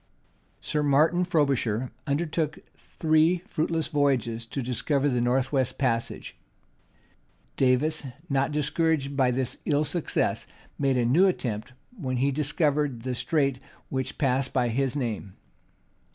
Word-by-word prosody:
Sir 150 Hz, -, -1 dB
Martin 150 Hz, +5 st, +3 dB
Frobisher 135 Hz, -, +1 dB, 0.2 s
undertook 155 Hz, +1 st, -1 dB, 0.2 s
three 160 Hz, +2 st, +1 dB
fruitless 165 Hz, -4 st, -1 dB
voyages 125 Hz, -6 st, 0 dB
to 135 Hz, +3 st, -4 dB
discover 135 Hz, +4 st, 0 dB
the 125 Hz, -3 st, +1 dB
north 125 Hz, +2 st, +1 dB
west 130 Hz, -4 st, 0 dB
passage: 115 Hz, -4 st, -2 dB, 1.2 s
Davis, 135 Hz, +3 st, +1 dB, 0.2 s
not 140 Hz, -1 st, +1 dB
discouraged 150 Hz, -1 st, 0 dB
by 130 Hz, -2 st, +3 dB
this 125 Hz, 0 st, -1 dB
ill 145 Hz, 0 st, +3 dB
success, 155 Hz, +2 st, -1 dB, 0.3 s
made 135 Hz, -2 st, +2 dB
a 120 Hz, -, +2 dB
new 160 Hz, +11 st, +5 dB
attempt, 120 Hz, -, -2 dB, 0.2 s
when 130 Hz, -, -3 dB
he 135 Hz, +3 st, +2 dB
discovered 145 Hz, -3 st, 0 dB
the 130 Hz, 0 st, -2 dB
straits 135 Hz, 0 st, 0 dB, 0.3 s
which 130 Hz, -1 st, -3 dB
pass 135 Hz, -2 st, +1 dB
by 125 Hz, -2 st, 0 dB
his 130 Hz, +3 st, 0 dB
name. 110 Hz, -8 st, -3 dB
140 Hz, 125 wpm, -26 LUFS, 125-150 Hz, 1.2 s, new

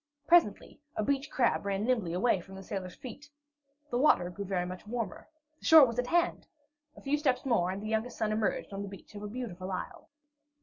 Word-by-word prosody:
Presently 335 Hz, -, +3 dB, 0.2 s
a 215 Hz, -, 0 dB
beach 275 Hz, +4 st, 0 dB
crab 245 Hz, -3 st, +1 dB
ran 200 Hz, 0 st, -1 dB
nimbly 230 Hz, -9 st, +1 dB
away 190 Hz, +1 st, +2 dB
from 190 Hz, +2 st, -12 dB
beneath 190 Hz, -1 st, -11 dB
the -, -, -3 dB
sailor's 185 Hz, -2 st, -5 dB
feet. 280 Hz, +4 st, -10 dB, 0.6 s
The 245 Hz, -, +1 dB
water 180 Hz, -11 st, +4 dB
grew 200 Hz, +3 st, -6 dB
very 185 Hz, -2 st, -1 dB
much 185 Hz, +3 st, -8 dB
warmer. 230 Hz, -4 st, -4 dB, 0.3 s
The -, -, -13 dB
shore 315 Hz, -3 st, +10 dB
was 235 Hz, -1 st, -3 dB
at 250 Hz, -, 0 dB
hand! 345 Hz, +3 st, +1 dB, 0.5 s
A -, -, -11 dB
few 290 Hz, +2 st, +1 dB
steps 265 Hz, -4 st, +1 dB
more, 225 Hz, -9 st, +2 dB
and 195 Hz, +2 st, -4 dB
the -, -, -4 dB
youngest 220 Hz, +2 st, -2 dB
son 215 Hz, -1 st, 0 dB
emerged 215 Hz, -1 st, -1 dB
on 195 Hz, -, -4 dB
the 200 Hz, -, -5 dB
beach 195 Hz, +1 st, -13 dB
of 205 Hz, -, -8 dB
a 210 Hz, -, -5 dB
beautiful 200 Hz, -5 st, -6 dB
isle. 185 Hz, -, -6 dB
215 Hz, 220 wpm, -30 LUFS, 195-255 Hz, 0.6 s, shore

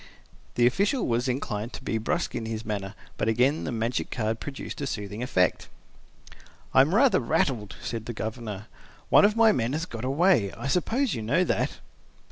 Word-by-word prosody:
The 120 Hz, -, +4 dB
official 200 Hz, -, +2 dB
was 120 Hz, +2 st, 0 dB
inclined 120 Hz, -3 st, -3 dB
to -, -, -8 dB
be 110 Hz, -, -1 dB
brusque 170 Hz, +10 st, -1 dB
in 110 Hz, -, -4 dB
his 110 Hz, 0 st, -4 dB
manner, 100 Hz, -1 st, -4 dB, 0.2 s
but 105 Hz, -, -1 dB
again 125 Hz, +7 st, +2 dB
the -, -, -3 dB
magic 115 Hz, +1 st, -2 dB
card 110 Hz, -1 st, -2 dB
produced 145 Hz, 0 st, -7 dB
a 140 Hz, -, -2 dB
soothing 105 Hz, -2 st, -5 dB
effect. 90 Hz, -8 st, +1 dB, 1.1 s
"I -, -, +7 dB
am 155 Hz, +8 st, +2 dB
rather 265 Hz, +3 st, +5 dB
rattled," 125 Hz, -6 st, 0 dB
said 115 Hz, -1 st, -4 dB
the 120 Hz, -, -3 dB
Governor. 110 Hz, -2 st, -5 dB, 0.4 s
"One -, -, +7 dB
of 210 Hz, +1 st, +3 dB
my 225 Hz, -1 st, +6 dB
men 120 Hz, -, 0 dB
has 160 Hz, +2 st, -1 dB
got 115 Hz, -9 st, -7 dB
away. 135 Hz, -, +3 dB
I -, -, -8 dB
suppose 225 Hz, -, +1 dB
you 115 Hz, -, -3 dB
know 140 Hz, +12 st, +2 dB
that?" -, -, -1 dB
120 Hz, 185 wpm, -26 LUFS, 110-160 Hz, 1.1 s, I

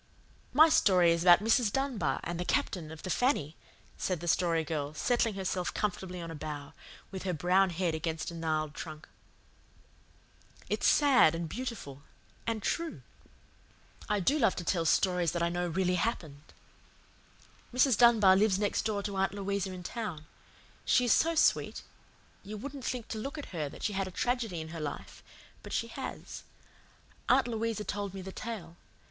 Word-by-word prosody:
"My 310 Hz, +5 st, +7 dB
story 185 Hz, -, +4 dB
is 170 Hz, 0 st, +1 dB
about 175 Hz, +2 st, +6 dB
Mrs. 225 Hz, -1 st, +3 dB
Dunbar 230 Hz, -, -1 dB
and 175 Hz, 0 st, -4 dB
the -, -, 0 dB
Captain 170 Hz, -2 st, -1 dB
of 160 Hz, -, -10 dB
the 185 Hz, -, -3 dB
FANNY," 165 Hz, -, +1 dB, 0.4 s
said 185 Hz, -3 st, -1 dB
the 175 Hz, -, -6 dB
Story 165 Hz, -1 st, +2 dB
Girl, 150 Hz, -1 st, -3 dB
settling 235 Hz, +3 st, +1 dB
herself 185 Hz, -2 st, -2 dB
comfortably 185 Hz, -3 st, -3 dB
on 165 Hz, -1 st, -6 dB
a -, -, -6 dB
bough, 150 Hz, -2 st, -6 dB, 0.4 s
with 190 Hz, -1 st, -5 dB
her 185 Hz, -1 st, -2 dB
brown 185 Hz, +4 st, +3 dB
head 175 Hz, -1 st, -1 dB
against 160 Hz, +1 st, -3 dB
a -, -, -9 dB
gnarled 155 Hz, -2 st, -2 dB
trunk. 155 Hz, -1 st, -8 dB, 1.6 s
"It's -, -, +1 dB
sad 265 Hz, -, +5 dB
and 165 Hz, 0 st, -3 dB
beautiful 220 Hz, -, -6 dB, 0.5 s
and 225 Hz, -2 st, -2 dB
true. 335 Hz, -1 st, -2 dB, 1.1 s
I 210 Hz, -1 st, +2 dB
do 280 Hz, -, +2 dB
love 195 Hz, -, +3 dB
to 180 Hz, -, -4 dB
tell 170 Hz, -1 st, 0 dB
stories 175 Hz, 0 st, +2 dB
that 170 Hz, -1 st, -1 dB
I 170 Hz, -, +2 dB
know 175 Hz, +1 st, -1 dB
really 180 Hz, +2 st, 0 dB
happened. 155 Hz, -10 st, -4 dB, 1.2 s
Mrs. 250 Hz, 0 st, +4 dB
Dunbar 220 Hz, -5 st, +6 dB
lives 200 Hz, -1 st, +3 dB
next 205 Hz, 0 st, 0 dB
door 205 Hz, -2 st, -1 dB
to 200 Hz, -2 st, -4 dB
Aunt 195 Hz, +1 st, 0 dB
Louisa 200 Hz, -1 st, -2 dB
in 180 Hz, -1 st, -8 dB
town. 180 Hz, -7 st, -5 dB, 0.6 s
She 250 Hz, -, +3 dB
is 240 Hz, -, +5 dB
so 330 Hz, +1 st, +2 dB
sweet. -, -, +2 dB, 0.6 s
You 210 Hz, +2 st, -7 dB
wouldn't 270 Hz, +3 st, -7 dB
think 245 Hz, -3 st, -3 dB
to 220 Hz, -, -4 dB
look 275 Hz, +7 st, -5 dB
at 295 Hz, -, -7 dB
her 155 Hz, -4 st, -2 dB
that -, -, -11 dB
she 210 Hz, -, 0 dB
had 195 Hz, -1 st, -1 dB
a -, -, -7 dB
tragedy 225 Hz, -5 st, -1 dB
in 160 Hz, -, -8 dB
her 165 Hz, -1 st, -6 dB
life, 145 Hz, -2 st, -6 dB, 0.4 s
but -, -, -10 dB
she -, -, -1 dB
has. -, -, -7 dB, 0.9 s
Aunt -, -, +4 dB
Louisa 225 Hz, -2 st, -2 dB
told 205 Hz, -2 st, -4 dB
me 190 Hz, -, -6 dB
the 190 Hz, -, -7 dB
tale. 190 Hz, -7 st, -7 dB
190 Hz, 175 wpm, -31 LUFS, 165-225 Hz, 1.6 s, My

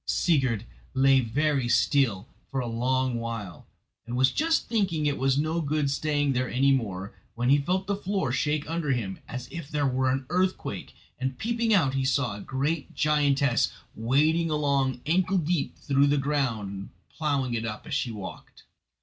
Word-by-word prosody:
Sigurd 130 Hz, -, +1 dB, 0.3 s
lay 135 Hz, 0 st, +5 dB
very 135 Hz, +1 st, 0 dB
still 120 Hz, -4 st, +2 dB, 0.2 s
for 135 Hz, -, -2 dB
a 125 Hz, -, -2 dB
long 125 Hz, +1 st, 0 dB
while, 115 Hz, -7 st, -6 dB, 0.4 s
and 120 Hz, +1 st, -3 dB
was 130 Hz, +1 st, +4 dB
just 320 Hz, +1 st, +1 dB
thinking 190 Hz, -9 st, 0 dB
it 145 Hz, -1 st, 0 dB
was 135 Hz, 0 st, +2 dB
no 155 Hz, +3 st, 0 dB
good 150 Hz, -2 st, 0 dB
staying 145 Hz, -1 st, +1 dB
there 130 Hz, 0 st, -1 dB
any 135 Hz, +2 st, +3 dB
more, 100 Hz, -7 st, -1 dB, 0.2 s
when 120 Hz, +1 st, 0 dB
he 145 Hz, -, +6 dB
felt 185 Hz, +6 st, -1 dB
the 200 Hz, -, 0 dB
floor 195 Hz, -7 st, -1 dB
shake 150 Hz, +3 st, 0 dB
under 160 Hz, -3 st, 0 dB
him 100 Hz, -6 st, -3 dB
as 125 Hz, 0 st, -6 dB
if 170 Hz, -5 st, -7 dB
there 150 Hz, -2 st, 0 dB
were 130 Hz, 0 st, +1 dB
an 130 Hz, +1 st, -1 dB
earthquake, 185 Hz, +1 st, -1 dB, 0.2 s
and 130 Hz, 0 st, -2 dB
peeping 235 Hz, -, 0 dB
out 160 Hz, -11 st, +4 dB
he 135 Hz, 0 st, 0 dB
saw 130 Hz, -5 st, +1 dB
a 100 Hz, -, -8 dB
great 140 Hz, +6 st, -2 dB
giantess 140 Hz, -4 st, +2 dB, 0.2 s
wading 155 Hz, +9 st, +2 dB
along 140 Hz, -4 st, +1 dB
ankle 185 Hz, +5 st, +2 dB
deep 170 Hz, -2 st, -1 dB
through 140 Hz, 0 st, +2 dB
the 145 Hz, +1 st, +2 dB
ground 135 Hz, -8 st, 0 dB
and 100 Hz, 0 st, -7 dB, 0.2 s
ploughing 140 Hz, -5 st, -1 dB
it 115 Hz, -1 st, -1 dB
up 105 Hz, -2 st, -5 dB
as 160 Hz, -, -6 dB
she 130 Hz, -4 st, 0 dB
walked. 105 Hz, -4 st, -9 dB
140 Hz, 175 wpm, -27 LUFS, 125-155 Hz, 0.4 s, he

